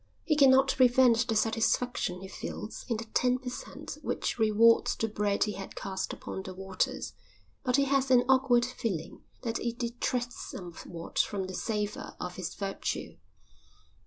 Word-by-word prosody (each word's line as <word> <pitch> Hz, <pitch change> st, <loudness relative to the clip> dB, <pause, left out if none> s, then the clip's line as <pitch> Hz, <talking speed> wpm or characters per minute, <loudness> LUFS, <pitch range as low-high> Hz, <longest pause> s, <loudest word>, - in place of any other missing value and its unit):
He 310 Hz, -, +2 dB
cannot 270 Hz, -2 st, +6 dB
prevent 245 Hz, -2 st, +5 dB
the 225 Hz, -, 0 dB
satisfaction 225 Hz, -3 st, +1 dB
he 190 Hz, -, -7 dB
feels 210 Hz, +2 st, -7 dB
in 230 Hz, -, +1 dB
the 225 Hz, -, -4 dB
ten 250 Hz, 0 st, +3 dB
per 250 Hz, -1 st, -6 dB
cent 245 Hz, -, -8 dB
which -, -, -2 dB
rewards 225 Hz, +1 st, +5 dB
the 225 Hz, -, -1 dB
bread 205 Hz, -1 st, +1 dB
he 210 Hz, -, -1 dB
had 195 Hz, -1 st, -8 dB
cast 190 Hz, -1 st, -3 dB
upon -, -, -6 dB
the 190 Hz, -1 st, -8 dB
waters, 190 Hz, 0 st, -2 dB, 0.5 s
but 250 Hz, -2 st, +2 dB
he 280 Hz, -, +4 dB
has 275 Hz, -1 st, +2 dB
an 250 Hz, -1 st, +6 dB
awkward 260 Hz, -2 st, +4 dB
feeling 210 Hz, -10 st, -4 dB, 0.2 s
that 230 Hz, -2 st, -1 dB
it 235 Hz, 0 st, -3 dB
detracts 245 Hz, 0 st, -2 dB
somewhat 170 Hz, -2 st, -7 dB
from 200 Hz, -2 st, +1 dB
the 185 Hz, -, -7 dB
savour 210 Hz, +1 st, -3 dB
of 180 Hz, 0 st, -5 dB
his 185 Hz, -3 st, -5 dB
virtue. 195 Hz, -1 st, -4 dB
230 Hz, 160 wpm, -30 LUFS, 195-250 Hz, 0.5 s, cannot